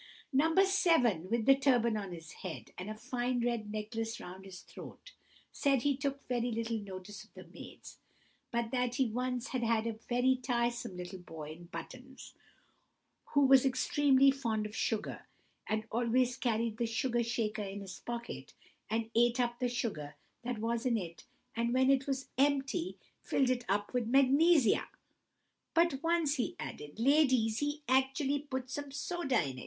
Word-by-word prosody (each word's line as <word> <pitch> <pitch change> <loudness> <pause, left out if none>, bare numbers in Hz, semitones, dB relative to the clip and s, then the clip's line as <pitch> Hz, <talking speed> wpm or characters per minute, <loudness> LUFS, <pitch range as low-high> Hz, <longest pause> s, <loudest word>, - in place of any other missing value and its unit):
No. 320 +5 +3
7, 330 - +3
with 230 0 0
the 270 - +7
turban 245 -5 +3
on 200 -3 -4
his 165 -1 -9
head, - - -8
and 185 +3 -6
a 215 - -4
fine 245 +1 -2
red 230 -3 -2
necklace 225 +1 -4
round 185 +2 -9
his 190 -1 -10
throat, - - -12 0.4
said 275 -4 +1
he 285 -1 +2
took 275 0 -4
very 245 -1 0
little 230 0 -2
notice 195 0 -8
of 220 - -22
the - - -9
maids, - - -12 0.5
but 235 -1 -2
that 250 -1 0
he 265 - +3
once 250 +1 -2
had 255 - -2
had 230 -1 +1
a 230 - -1 0.2
very 255 +1 +3
tiresome 240 -5 -1
little 180 +1 -7
boy 160 -4 -8
in 170 +2 -11
buttons, 255 +8 -9 1.0
who 285 - +6
was 265 -1 +7
extremely 275 +1 +4
fond 230 -6 -2
of 210 +1 -7
sugar, 220 -2 -2 0.4
and 215 0 0
always 245 +2 +2
carried 230 -3 -1
the 235 - 0
sugar 240 +1 0
shaker 225 -2 -1
in 200 0 -5
his 190 -2 -8
pocket, 235 0 -6 0.3
and 225 +1 -1
ate 240 +1 +3
up 240 -1 0
the 250 - +1
sugar 155 -12 -3 0.3
that 245 -1 -3
was 230 +2 -1
in 245 -3 +2
it, 170 -5 -7 0.3
and 235 +1 0
when 260 +1 +5
it 275 0 +2
was 270 -1 -2
empty, 285 +5 +1 0.2
filled 260 -2 +1
it 245 -1 -1
up 205 +3 0
with 245 -3 0
magnesia. 275 - +4 0.9
"But 335 -5 +3
once," 330 -3 +1
he 245 - -1
added, 150 +7 -7
"ladies, 255 -4 +3
he 290 +1 -2
actually 270 +2 +2
put 260 -3 -5
some 285 +1 -4
soda 285 -1 0
in. 130 -1 -6
240 Hz, 170 wpm, -33 LUFS, 220-270 Hz, 1.0 s, the